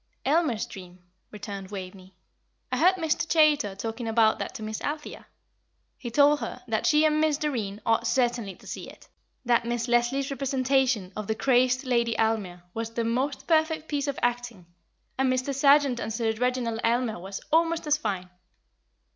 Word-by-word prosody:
"Aylmer's 290 -6 +1
Dream," 180 -2 -11 0.3
returned 200 -2 -7
Waveney. 190 -1 -9 0.6
"I - - 0
heard 365 +3 +5
Mr. 325 -2 -1
Chaytor 300 -11 +3
talking 225 +3 -4
about 225 -1 +3
that - - -5
to 220 - -6
Miss 215 0 -5
Althea. 295 +1 -5 0.7
He 240 - -7
told 290 +4 +4
her - - -6
that - - 0
she 305 -1 +4
and 305 0 +2
Miss 310 -2 +2
Doreen 225 -10 -3
ought 230 +1 +2
certainly 240 -7 0
to - - -19
see - - -7
it - - -16 0.4
that 235 -1 +3
Miss 235 0 -2
Leslie's 245 +4 +1
representation 260 -6 0
of 215 -1 -5
the 220 - 0
crazed 255 +1 +2
Lady 235 -2 +1
Aylmer 205 -6 -1
was 225 0 -3
the 235 - 0
most 255 +5 -1
perfect 315 -1 +1
piece 290 -1 -2
of 280 - -2
acting; 245 -6 -2 0.5
and 265 -1 +3
Mr. 255 +2 -1
Sargent 275 -2 +4
as 225 -1 -4
Sir 225 -1 0
Reginald 240 -1 -1
Aylmer 230 -3 0
was 195 +2 -6
almost 330 +1 +2
as 300 0 +3
fine." 195 -9 -3
245 Hz, 170 wpm, -26 LUFS, 220-285 Hz, 0.7 s, heard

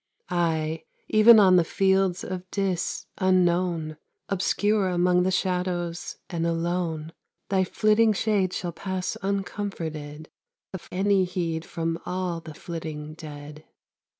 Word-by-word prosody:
Ay! 160 -2 0 0.3
even 220 +1 +8
on 185 -3 +6
the 175 - +5
fields 190 +1 +1
of 185 0 -6
Dis 190 -3 -2
unknown, 175 -4 +2 0.3
Obscure 200 +1 +1
among 180 0 +3
the 185 - +2
shadows 180 -2 -2
and 170 -1 -2
alone, 165 -1 -2 0.4
Thy 190 -1 +3
flitting 215 +4 +3
shade 205 -3 +1
shall 175 -1 -3
pass 185 +1 -3
uncomforted 165 -6 -4 0.5
Of 190 - -8
any 195 +1 +2
heed 170 -2 -3
from 165 0 -3
all 180 -2 -2
the 155 -2 -10
flitting 155 -3 -6
dead. 150 -1 -10
180 Hz, 120 wpm, -26 LUFS, 165-190 Hz, 0.5 s, even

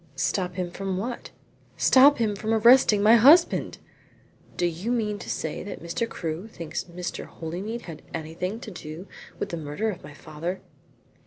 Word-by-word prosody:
"Stop 180 +5 -1
him 180 -2 -3
from 190 0 -3
what?" 235 +5 -5 0.5
"Stop 275 +2 +6
him 220 -4 0
from 220 +3 -1
arresting 225 -2 +6
my 225 +3 +7
husband." 305 +9 +5 0.8
"Do 175 - +1
you 175 +7 -2
mean 210 -4 -1
to - - -8
say 160 - -3
that 205 - -8
Mr. 170 +7 -2
Crewe 165 +4 -5
thinks 170 -7 -6
Mr. 180 0 -6
Holymead 190 +9 -6
had 165 -3 -9
anything 165 +6 -4
to 215 - -8
do 165 +1 -8 0.3
with - - -3
the 170 - -4
murder 160 +9 -2
of 185 -2 -9
my 145 - -11
father?" 155 +5 -5
190 Hz, 165 wpm, -26 LUFS, 170-220 Hz, 0.8 s, my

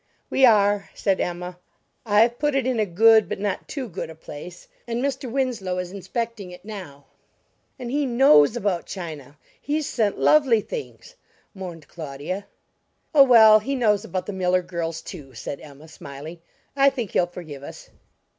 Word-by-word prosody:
"We 265 - +5
are," 205 -2 +3
said 195 -2 0
Emma. 180 +1 -4 0.5
"I've 225 +3 +3
put 295 -1 +1
it 270 -3 +1
in 255 -3 0
a 215 - +1
good 220 +4 +5
but - - -4
not 205 0 -3
too 270 -4 -5
good 180 -4 -6
a 160 - -10
place, 165 +3 -10 0.2
and 235 0 -2
Mr. 270 -1 -2
Winslow 240 -9 -1
is 180 -1 -4
inspecting 200 +1 -5
it 180 +1 -13
now." 180 -10 -9 0.7
"And 245 -3 -6
he 285 0 0
knows 235 - +5
about 195 -7 -1
china; 155 -6 -8 0.2
he's 300 +1 -1
sent 215 -4 0
lovely 270 -8 +4
things," - - -8 0.4
mourned 175 -6 -8
Claudia. 160 +5 -6 0.7
"Oh, 295 - +7
well, 220 -5 +8
he 275 +6 -3
knows 210 -5 +2
about 185 +1 -4
the 205 - -5
Miller 185 -1 +1
girls, 165 -2 -4
too," 140 - -10
said 140 +4 -6
Emma, 145 +1 -13
smiling; 155 +2 -10 0.4
"I 275 0 +5
think 245 -8 -5
he'll 175 - +2
forgive 160 -6 -9
us." 140 - -11
200 Hz, 165 wpm, -23 LUFS, 170-240 Hz, 0.7 s, well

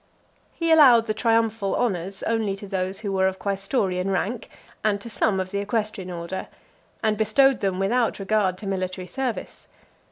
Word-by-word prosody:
He 335 -1 0
allowed 260 -8 +7
the 215 - -1
triumphal 225 -2 +1
honours 195 -4 -2
only 220 -3 0
to 200 +1 -9
those 190 0 -3
who 205 -3 -3
were 190 -1 +2
of 190 0 -2
quaestorian 195 -2 -1
rank, 195 +5 -2 0.3
and 205 -2 +1
to 230 +3 -8
some 200 -1 +1
of 185 0 -3
the 200 - -1
equestrian 205 -2 -2
order; 175 +2 -5 0.6
and 215 -1 +2
bestowed 255 +5 +4
them 190 -2 -1
without 230 +5 +1
regard 195 -2 0
to 210 - -9
military 185 -1 -3
service. 250 +6 -5
200 Hz, 165 wpm, -24 LUFS, 190-225 Hz, 0.6 s, allowed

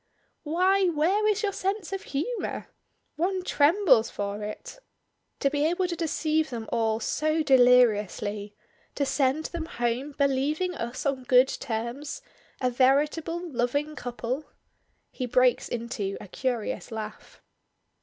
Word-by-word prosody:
"Why, 370 +5 +2
where 360 +6 +2
is 425 0 +1
your 410 - +1
sense 390 -1 -2
of 390 - -3
humor? 370 - -3 0.5
One 370 +3 0
trembles 290 - +4
for 205 +1 -4
it! - - -7 0.6
To 275 - +2
be 290 0 0
able 355 +3 0
to 345 - -3
deceive 315 -2 0
them 230 -3 -5
all 225 -2 +1
so 310 +6 0
deliriously; 215 -6 +3 0.4
to 280 - 0
send 275 +3 +1
them 330 -1 -4
home 245 0 -2
believing 285 +6 +1
us 235 -3 -5
on 270 -2 -1
good 255 0 +5
terms, 245 - -4 0.4
a 250 -1 +1
veritable 300 +7 +1
loving 285 +3 -1
couple" 245 +3 -4 0.7
he 255 - -4
breaks 250 0 +3
into 230 -4 -3
a - - -10
curious 245 +1 -3
laugh. 215 -1 -7
275 Hz, 130 wpm, -27 LUFS, 240-330 Hz, 0.7 s, good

